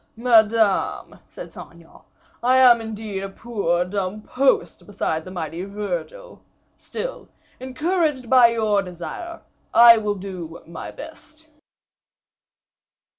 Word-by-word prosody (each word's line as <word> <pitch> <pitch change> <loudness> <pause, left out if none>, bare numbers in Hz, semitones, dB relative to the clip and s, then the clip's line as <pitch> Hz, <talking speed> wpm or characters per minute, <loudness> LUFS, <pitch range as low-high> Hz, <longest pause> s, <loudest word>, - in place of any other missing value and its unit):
"Madame," 225 -3 +2
said - - -10
Saint - - -11
Aignan, - - -18 0.4
"I 255 +2 +3
am 245 -3 +6
indeed 215 -3 -6
a 195 - -5
poor 195 -5 -2
dumb 200 +2 -4
post 265 +4 0
beside 160 -5 -3
the 185 - -10
mighty 175 -1 -5
Virgil. 205 - -6 0.3
Still, - - -7 0.3
encouraged 295 0 -1
by 250 -1 +6
your 220 -3 +1
desire, 195 - -8 0.3
I 235 -1 +9
will 210 -1 -2
do 185 -4 -8
my 165 0 -8
best." 315 0 -13
220 Hz, 115 wpm, -22 LUFS, 190-255 Hz, 0.4 s, I